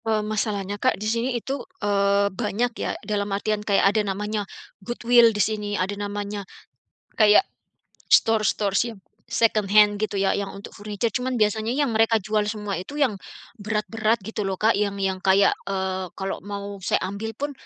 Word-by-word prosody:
Eee, 215 -1 +1
masalahnya, 205 -2 -2
Kak, 255 - +2
di 210 - -6
sini 230 +3 0
itu, 265 +3 -4 0.2
eee, 200 0 +2
banyak 225 +3 -1
ya. - - -1
Dalam 205 -1 -1
artian, 210 +1 -1
kayak 200 -1 +3
ada 215 - +2
namanya 210 +1 -3 0.3
goodwill 240 +2 +4
di 215 - -4
sini. 210 0 -1
Ada 190 +2 -1
namanya, 205 0 -4 0.7
kayak 215 - +5 0.7
store-store 215 -2 +3 0.2
yang 220 - -11 0.3
secondhand 210 -2 +3
gitu 215 -1 -2
ya, 195 0 +2
yang 200 -1 -2
untuk 200 - -10
furniture. 210 +2 -3
Cuman 250 +2 -1
biasanya 215 0 +1
yang 285 -5 +1
mereka 225 +1 +3
jual 210 0 0
semua 210 -4 -3
itu 235 +11 -8
yang 280 -6 +2 0.5
berat-berat 215 +1 -1
gitu 220 +1 -5
loh, 195 -2 -1
Kak. 220 +4 +3
Yang 200 0 -1
yang 190 -1 -1
kayak, 195 +1 +4 0.2
eee, 190 -1 -2
kalau 195 0 -4
mau 200 0 -6
saya 185 - +1 0.2
ambil 220 +2 -5
pun 290 +3 -3
210 Hz, 165 wpm, -24 LUFS, 200-220 Hz, 0.7 s, kayak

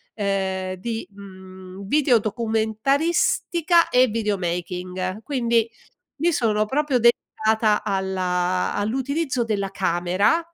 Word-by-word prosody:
ehm, 190 -2 -2
di, 225 +4 -5
mhmm, 190 -1 -11
video 275 -3 +3
documentaristica 270 - +1
e 255 +1 +4
videomaking. 185 -2 -3
Quindi 235 -5 +1 0.5
mi 345 +1 +3
sono 215 -6 +1
proprio 275 +1 0
dedicata 220 -2 +2
alla 185 -2 -1
all'utilizzo 260 +5 -1
della 200 -3 -2
camera, 185 - +1
215 Hz, 90 wpm, -23 LUFS, 190-245 Hz, 0.5 s, e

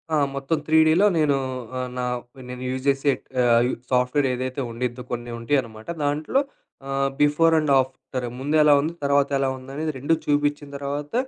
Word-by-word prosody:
ఆ! - - +3 0.2
మొత్తం 140 +4 -1
త్రీడిలో 160 +5 +5
నేను 150 -3 +3 0.4
ఆహ్, 125 0 -3
నా 125 - -1 0.4
నేను 125 0 -6
యూజ్ 130 +1 -4
జేసే 140 +1 +3 0.3
ఆహ్, 120 0 +4 0.2
సాఫ్ట్‌వేర్ 125 +2 +2
ఏదైతే 130 +2 -3
ఉండిద్దో, 125 +1 -4
కొన్ని 120 0 -4
ఉంటయి 135 +4 +2
అనమాట 110 -2 -13 0.2
దాంట్లో 150 - +1 0.5
ఆహ్, 135 0 +1
బిఫోర్ 160 +3 +4
అండ్ 150 -2 0
ఆఫ్టర్ 130 -1 -4
ముందు 145 +3 -1
ఎలా 150 -1 +6
ఉంది 160 +3 -2
తర్వాత 140 0 +3
ఎలా 135 -1 +1
ఉందనేది 140 +5 -4
2 145 +5 +1
చూపిచ్చిన 145 0 0
తర్వాత, 145 +1 -5
140 Hz, 160 wpm, -23 LUFS, 125-145 Hz, 0.5 s, ఎలా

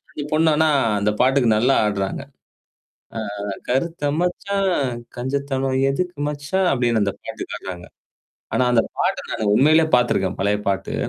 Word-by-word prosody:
இந்த 145 - -4
பொண்ணு 160 +1 +4
ஆனா, 160 0 +3 0.3
அந்த 105 +1 +2
பாட்டுக்கு 130 -1 +3
நல்லா 125 +5 +3
ஆடுறாங்க. 100 -2 -2 1.0
ஆ, - - -1 0.5
"கருத்த 145 +4 -1 0.2
மச்சான், 195 +2 0 0.5
கஞ்சத்தனம் 135 +1 -1
எதுக்கு 180 +5 -3
மச்சான்" 150 +6 -1
அப்பிடின்னு 120 -4 +1
அந்த 100 - -1
பாட்டு - - -6
ஆட்றாங்க. 90 -2 -7 0.7
ஆனா, 125 - +3
அந்த 115 -2 +4 0.2
பாட்ட - - +1
நானு 105 -2 -1
உண்மையிலேயே 155 +6 +4
பாத்துருக்கேன். 100 -6 0
பழைய 100 +1 +1
பாட்டு. 95 0 -2
135 Hz, 135 wpm, -21 LUFS, 110-155 Hz, 1.0 s, பொண்ணு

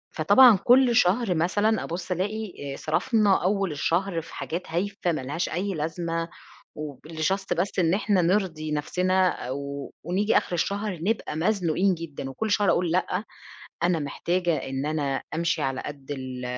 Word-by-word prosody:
فطبعًا، 250 -5 +7
كل 245 -1 +5
شهر 200 -1 +3
مثلًا 200 +6 +1
أبُص 175 +2 -5
ألاقي 185 -6 -3
آآ، - - -5
صرفنا 205 +4 +2
أول 195 -1 +1
الشهر 170 +4 0
في 160 - -12
حاجات 175 +3 -4
هايفة 185 +1 -1
ما 155 - -2
لهاش 145 +7 -2
أي 195 +4 -2
لازمة، 165 +1 -3 0.5
وب 150 -3 -7
لJust 170 +5 -1
بس 185 +2 -1
إن 170 -1 +3
إحنا 200 -1 +2
نرضي 170 -4 0
نفسنا، 185 +5 +1 0.2
أو 140 +1 -5
ونيجي 190 +6 +2
آخر - - -1
الشهر 200 +1 -1
نبقى 210 -4 -1
مزنوقين 180 +1 +1
جدًا 155 -5 -6
وكل 215 +11 -3
شهر 205 -1 +3
أقول: 175 -2 +1
"لأ 185 +2 0 0.6
أنا 175 -1 +2
محتاجة 170 +3 -1
إن 135 0 -3
أنا 145 -3 -1
أمشي 165 -1 0
على 135 -1 -1
قد 145 -1 -9
ال 130 -2 -5
175 Hz, 155 wpm, -26 LUFS, 155-195 Hz, 0.6 s, فطبعًا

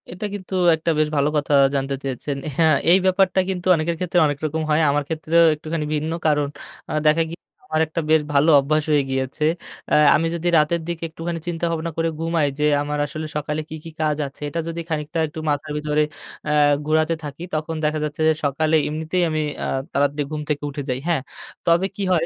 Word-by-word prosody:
এটা 180 +4 -6
কিন্তু 195 -2 -7 0.2
একটা 160 +1 -1
বেশ 155 - +3
ভালো 145 0 +2
কথা 145 0 0 0.2
জানতে 135 0 -1
চেয়েছেন। 135 +1 -3 0.2
হ্যাঁ, 160 -3 +5 0.2
এই 180 - +8
ব্যাপারটা 190 0 +3
কিন্তু 185 -1 -3
অনেকের 165 +1 -1
ক্ষেত্রে 180 -1 +1
অনেক 145 -1 -2
রকম 160 +1 -1
হয় 155 +1 +3
আমার 145 +1 +1
ক্ষেত্রেও 160 +1 +2
একটুখানি 155 +1 -4
ভিন্ন 155 +2 -2 0.2
কারণ 145 -1 +2 0.4
আ - - -2
দেখা 160 +2 +4
গিয়ে 170 - -8 0.3
আমার 155 0 0
একটা 160 +2 -3
বেশ 160 -1 +5
ভালো 145 +3 +4
অভ্যাস 155 +2 +1
হয়ে 145 -2 +4
গিয়েছে। 130 +2 -2 0.5
আ - - +5 0.2
আমি 165 - +1
যদি 170 +1 -3
রাতের 155 +2 +2
দিকে 170 -1 -4
একটুখানি 165 +1 -5
চিন্তাভাবনা 165 -1 -2
করে 165 0 +1
ঘুমাই 165 -2 +1
যে 150 - +2 0.2
আমার 150 0 -2
আসলে 155 +2 -6
সকালে 150 +1 -2
কী, 160 - -6
কী 165 - -8
কাজ 150 -1 +1
আছে? 140 - -16
এটা 165 - -3
যদি 165 0 -4
খানিকটা 155 0 -2
একটু 155 +1 -8
মাথার 145 +1 -2
ভিতরে 150 0 +1 0.5
আ - - +1 0.3
ঘোরাতে 155 +1 +2
থাকি 145 +3 -7
তখন 155 +1 -2
দেখা 155 +1 +1
যাচ্ছে 150 +1 -4
যে 160 - +5
সকালে 155 +3 +1
এমনিতেই 160 +4 -1
আমি 155 0 -1 0.2
আ - - -2 0.3
তাড়াতাড়ি 145 +1 +1
ঘুম 155 -1 -3
থেকে 150 -1 -1
উঠে 145 0 -5
যাই, 125 0 -1
হ্যাঁ। 165 -6 +1 0.4
তবে 170 +2 +3
কি 200 - -3
হয় 165 -2 +2
155 Hz, 200 wpm, -22 LUFS, 150-165 Hz, 0.5 s, এই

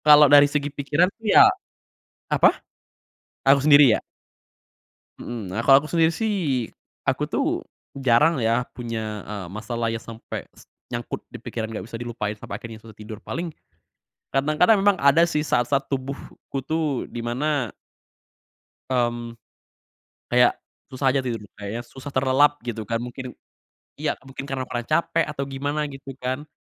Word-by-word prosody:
Kalau 150 0 +9
dari 145 0 +8
segi 145 0 -1
pikiran 145 +5 +2
tuh 225 - -17
ya - - +9 0.8
apa? - - +4 0.9
Aku 140 +1 +6
sendiri, 145 -1 +7
ya? - - -5 1.2
Mhm, 110 -6 -6
nah 100 - -2
kalau 135 +1 +7
aku 155 - -8
sendiri 165 -1 +3
sih, 160 - -1 0.3
aku - - 0
tuh - - -1 0.3
jarang 135 +4 +3
ya 115 +1 +2
punya, 110 -4 -5
eee, 100 -4 -5
masalah 115 +2 -3
ya 115 - -3
sampe 115 0 -8
s - - -16 0.3
nyangkut 120 0 -4
di 120 - -8
pikiran, 110 -1 -5
gak 110 - -6
bisa 115 - -8
dilupain 115 -3 -4
sampai 105 - -7
akhirnya 115 -2 -9
susah 110 -1 -14
tidur, 110 0 -9
paling 170 0 -4 0.8
kadang-kadang 155 +10 +3
memang 200 0 +4
ada 140 +4 +5
sih 150 -2 0
saat-saat 135 0 +1
tubuhku 135 0 -5
tuh 155 -2 -1
di 120 - -5
mana 130 0 -1 1.2
mmm, 120 -2 -1 1.0
kayak 125 0 +4 0.3
susah 130 0 +1
aja 135 - +2
tidur, 125 -3 -3 0.2
kayaknya 105 +4 -4
susah 130 +3 -10
terlelap 135 +2 +3
gitu 115 -2 -4
kan, 115 - 0
mungkin 125 +2 -6 0.6
iya, - - 0
mungkin 135 +1 -8
karena 130 -1 -2
kurang 120 -1 -5
capek 165 +1 +2
atau 140 -2 -3
gimana 145 +2 -2
gitu 135 -2 -9
kan. 130 +4 -4
130 Hz, 150 wpm, -24 LUFS, 115-145 Hz, 1.2 s, Kalau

